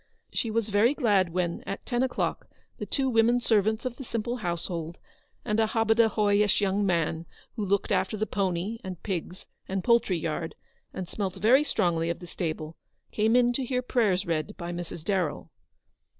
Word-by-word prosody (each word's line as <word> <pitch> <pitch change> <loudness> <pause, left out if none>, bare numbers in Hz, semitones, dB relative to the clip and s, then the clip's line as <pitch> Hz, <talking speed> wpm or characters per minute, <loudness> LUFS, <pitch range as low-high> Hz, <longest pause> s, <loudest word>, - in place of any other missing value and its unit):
She 230 - -1
was 225 0 0
very 215 +7 +3
glad 200 - +2
when, 175 -1 -1
at 195 - -5
ten 240 -1 0
o'clock, 260 -1 -1 0.3
the - - -4
two 270 -2 0
women 235 0 +4
servants 220 0 +1
of 250 -1 -3
the 270 - -6
simple 235 0 -3
household 170 -3 -3 0.5
and 210 +1 0
a 220 - +4
hobadahoyish 215 -2 +3
young 200 0 +1
man, 170 -3 0 0.3
who 220 - -2
looked 200 0 0
after 215 +3 +1
the 215 - 0
pony 195 +2 -1
and 185 -2 -7
pigs 185 -2 -4 0.2
and 190 -1 -2
poultry 235 -6 +3
yard, 160 0 -3 0.4
and 185 -2 -5
smelt 195 0 -3
very 235 +9 +5
strongly 170 - 0
of 170 - -1
the 175 - -10
stable, 160 -2 -4 0.3
came 220 +2 +2
in 245 -1 +4
to 265 - -1
hear 250 0 -1
prayers 210 -7 +1
read 165 +4 -2
by 175 -2 -5
Mrs. 175 -2 -6
Darrell. 180 -4 -1
205 Hz, 175 wpm, -27 LUFS, 175-230 Hz, 0.5 s, very